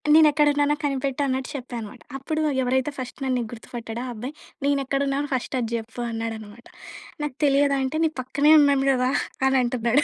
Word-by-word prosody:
నేనెక్కడున్నానో 295 -1 +4
కనిపెట్టన్నట్టు 270 -1 -1
చెప్పానమాట. 240 -2 -7 0.2
అప్పుడు 310 +4 -2 0.2
ఎవరైతే 260 +3 +1
ఫస్ట్ 255 -1 -6
నన్ను 260 -1 0
నీకు 230 - -4
గుర్తుపట్టాడో 230 0 -7
ఆ - - -5
అబ్బాయి 245 +6 -6 0.3
"నేను 285 0 +2
ఎక్కడున్నానో 275 +1 0
ఫస్ట్ 255 - -3
అది 230 -1 -3
చెప్పు" 225 +1 -8
అన్నాడనమాట. 225 0 -6 0.6
నాకు 290 -4 -3
తెలియదు 280 0 +3
అంటే 265 +4 -1
"నీ 315 - +1
పక్కనే 285 +4 +4
ఉన్నాను 280 -1 +3
కదా!" 255 0 +1 0.4
అని 265 0 +3
అంటున్నాడు. 240 +3 +2
260 Hz, 155 wpm, -24 LUFS, 240-285 Hz, 0.6 s, నేనెక్కడున్నానో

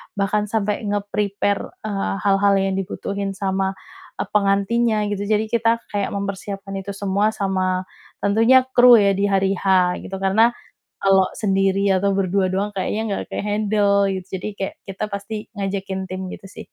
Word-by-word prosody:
bahkan 210 +1 0
sampai 210 0 -1
nge-prepare, 205 0 -2
eee, 200 -3 -2
hal-hal 200 0 +3
yang 195 0 0
dibutuhin 195 0 -4
sama, 190 0 -1 0.4
eee, - - -4
pengantinnya 210 +2 +2
gitu, 205 0 -3
jadi 215 0 +2
kita 230 0 +1
kayak 205 -1 -1
mempersiapkan 195 0 -5
itu 200 +1 -6
semua 200 +2 0
sama 185 -2 0 0.4
tentunya 225 +6 +5
kru 245 -1 +8
ya 200 -2 +4
di 200 +1 +1
hari 195 -1 +2
H 185 -2 +2
gitu 195 - -7
karena 215 +5 +3 0.5
kalo 195 -1 +4
sendiri 195 -1 +1 0.2
atau 200 +1 +1
berdua 190 0 +1
doang 200 +2 -1
kayaknya 210 +3 -1
enggak 200 - -2
ke-handle 205 -1 +1
gitu, 190 -1 -4
jadi 185 - -5
kayak 195 - -3 0.2
kita 195 +2 -4
pasti 210 +1 -6
ngajakin 195 -1 -4
tim 185 0 -4
gitu 195 - -12
sih. - - -15
200 Hz, 155 wpm, -21 LUFS, 195-210 Hz, 0.5 s, kru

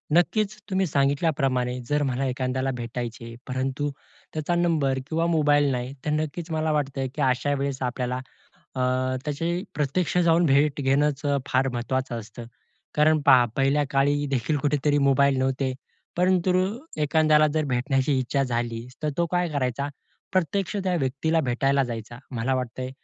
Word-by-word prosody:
नक्कीच 210 +4 +2
तुम्ही 190 0 +1
सांगितल्याप्रमाणे, 140 -4 +1
जर 145 0 +2
मला 130 +2 -1
एखाद्याला 130 +1 -1
भेटायचे, 115 -1 -6
परंतु 135 +3 -2 0.4
त्याचा 155 +2 -1
नंबर 155 -6 +1
किंवा 165 +2 0
मोबाईल 145 -2 +3
नाही. 125 +1 -3
तर 150 - 0
नक्कीच 160 +2 -4
मला 155 0 0
वाटतं, 140 -3 -1
की 155 - -3
अशा 130 +1 +1
वेळेस 140 -1 -2
आपल्याला 125 0 -3 0.6
अ, - - -1 0.4
त्याचे 150 +2 -2 0.3
प्रत्यक्ष 150 +5 -1
जाऊन 170 +1 +4
भेट 145 +1 +3
घेणंच 140 +1 +2
अ, 145 0 +2
फार 130 +1 +2
महत्त्वाचं 125 0 -2
असतं. 115 +2 -10 0.5
कारण 155 +1 +4
पहा, 125 -2 +7
पहिल्या 140 +2 +2
काळीदेखील 140 -1 +1
कुठेतरी 145 +1 +1
मोबाईल 140 0 +4
नव्हते. 130 0 0 0.4
परंतु 185 0 +2 0.5
एखाद्याला 155 0 +4
जर 155 -1 +1
भेटण्याची 135 +2 +1
इच्छा 130 +2 0
झालीच 120 -1 -3
तर 155 - 0
तो 170 - +2
काय 180 -1 +1
करायचा, 140 -2 -1 0.4
प्रत्यक्ष 185 +3 0
त्या 185 -1 +1
व्यक्तीला 155 +3 0
भेटायला 135 +1 +1
जायचा. 120 0 -6 0.2
मला 120 +4 0
वाटतंय, 130 0 -3
140 Hz, 145 wpm, -25 LUFS, 130-155 Hz, 0.6 s, पहा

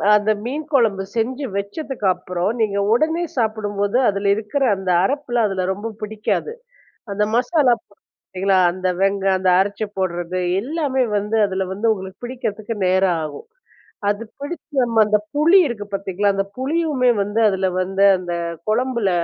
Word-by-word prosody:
அந்த 210 +1 +2
மீன் 290 +5 -3
கொழம்பு 215 -7 +3
செஞ்சு 255 +5 -1
வச்சதுக்கு 215 +3 -4
அப்பறம் 180 +5 -3
நீங்க 200 -2 +1 0.2
ஒடனே 320 +6 +1
சாப்பிடும்போது 210 -1 0
அதில 200 0 +1
இருக்கிற 225 +7 -2
அந்த 190 -1 -2
அரப்புலாம் 245 -2 0
அதில 185 -1 -1
ரொம்ப 210 +4 -5
புடிக்காது. 215 - -2 0.6
அந்த 210 +1 +1
மசாலா 250 +1 +3
பார்த்தீங்களா, 195 -1 -3 0.2
அந்த 185 0 -2
வெங் 195 0 +2 0.2
அந்த 185 0 +1
அரச்சி 205 +2 0
போடுறது 180 -1 -2 0.2
எல்லாமே 275 -1 0
வந்து 210 +2 -1
அதில 190 0 -2
வந்து 215 +4 -1
உங்களுக்கு 190 +3 -9
பிடிக்கிறதுக்கு 230 -3 -4
நேரம் 185 -2 +3
ஆகும். 150 - -9 0.6
அது 210 +2 -1 0.2
பிடிச்சி 290 +1 -7
நம்ம 230 -2 -2
அந்த 210 0 +4 0.2
புளி 320 +6 +5
இருக்கு 210 -4 -5
பார்த்தீங்களா, 195 +1 0
அந்த 195 0 0
புளியுமே 280 -1 +1
வந்து 205 +3 -1
அதில 190 -1 0
வந்து 195 +2 0
அந்த 180 -1 -5 0.3
கொழம்பில 235 -2 +1
210 Hz, 145 wpm, -20 LUFS, 195-250 Hz, 0.6 s, புளி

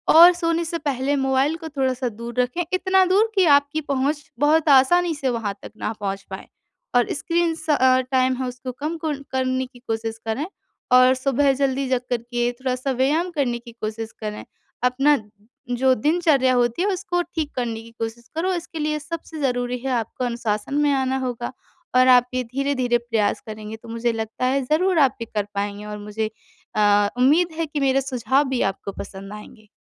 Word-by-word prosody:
और 345 +2 +10
सोने 335 -1 0
से 335 +1 -3
पहले 285 -1 -1
मोबाइल 270 +2 +1
को 320 - -5
थोड़ा-सा 260 -3 -1
दूर 235 +3 -6
रखें 250 +8 -1
इतना 375 +1 +3
दूर 405 +5 +3
कि 380 -2 +4
आपकी 285 +2 -3
पहुँच 285 +1 -1 0.2
बहुत 305 +1 +3
आसानी 325 +5 +5
से 275 -2 -1
वहाँ 225 -5 -2
तक - - -9
ना - - -2
पहुँच 195 -1 -3
पाए 190 - -7 0.5
और 245 - +4
स्क्रीन 335 +3 0
स 315 0 -10
अ, 260 -2 +4
टाइम 255 0 +3
है 260 -1 -2
उसको 250 +1 -6
कम 305 +6 -4
कुर 300 -3 -3
करने 260 0 0
की 250 -1 -16
कोशिश 225 0 -3
करें। 245 +8 -1 0.5
और 255 +1 +7
सुबह 275 +1 +2
ज़ल्दी 270 0 0
जग 255 -1 +1
कर 245 - +1
के 240 0 -1
थोड़ा-सा 255 +1 -2
व्यायाम 285 +8 +1
करने 260 -7 -1
की 235 0 -12
कोशिश 220 +1 -4
करें। 210 -1 -5 0.4
अपना 270 +4 +4 0.5
जो 260 +2 +3
दिनचर्या 295 -1 +2
होती 240 +5 +1
है - - +1
उसको 355 -2 -1
ठीक 320 -4 -4
करने 230 -3 -2
की 230 0 -14
कोशिश 230 +1 -5
करो 370 +3 0
इसके 345 -1 -5
लिए 305 0 -1
सबसे 320 +1 -7
ज़रूरी 245 -2 0
है 265 - 0
आपको 230 +3 -4
अनुशासन 235 0 -2
में 290 - +3
आना 265 -1 +1
होगा 240 -1 -4 0.4
और 255 0 +6
आप 250 -1 +6
ये 255 - 0
धीरे-धीरे 260 -3 +1
प्रयास 230 -3 -1
करेंगे 215 0 -7
तो 230 +1 -14
मुझे 230 +1 0
लगता 225 +2 -3
है 270 +2 +2
ज़रूर 335 +5 +2
आप 270 -2 +4
ये - - -2
कर 205 -1 +1
पाएँगे 205 +1 -3
और 210 0 -6
मुझे 210 +1 -3 0.5
अ, 205 -1 +4
उम्मीद 315 +7 +3
है 330 - +1
कि 295 0 -3
मेरे 270 -1 +2
सुझाव 260 0 +1
भी 255 -2 0
आपको 200 - -8
पसंद 195 +1 -8
आएँगे। 215 +1 -12
260 Hz, 190 wpm, -22 LUFS, 235-295 Hz, 0.5 s, और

